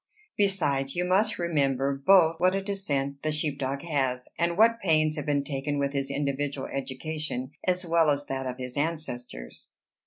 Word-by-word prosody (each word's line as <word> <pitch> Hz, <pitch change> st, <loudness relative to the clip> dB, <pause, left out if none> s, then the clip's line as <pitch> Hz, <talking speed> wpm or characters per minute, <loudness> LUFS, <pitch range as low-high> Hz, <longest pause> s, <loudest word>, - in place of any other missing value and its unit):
Besides, 145 Hz, -10 st, +1 dB
you 175 Hz, +1 st, 0 dB
must 205 Hz, +4 st, +2 dB
remember, 140 Hz, -5 st, +1 dB
both 165 Hz, +3 st, +5 dB
what 185 Hz, +2 st, +3 dB
a 195 Hz, -, -1 dB
descent 140 Hz, -9 st, -2 dB
the 155 Hz, -, 0 dB
sheep 150 Hz, -2 st, -2 dB
dog 135 Hz, +1 st, -2 dB
has, 130 Hz, -6 st, -1 dB
and 170 Hz, +1 st, +1 dB
what 230 Hz, +2 st, +5 dB
pains 155 Hz, -5 st, +2 dB
have 150 Hz, -2 st, -5 dB
been 145 Hz, -1 st, +2 dB
taken 145 Hz, +1 st, -2 dB
with 140 Hz, 0 st, 0 dB
his 140 Hz, -1 st, -1 dB
individual 140 Hz, 0 st, -2 dB
education, 135 Hz, 0 st, -4 dB, 0.2 s
as 180 Hz, 0 st, +1 dB
well 165 Hz, -2 st, +3 dB
as 145 Hz, 0 st, 0 dB
that 135 Hz, -1 st, -3 dB
of 125 Hz, 0 st, -4 dB
his 125 Hz, -1 st, -6 dB
ancestors." 140 Hz, -, -4 dB
145 Hz, 175 wpm, -27 LUFS, 135-170 Hz, 0.2 s, both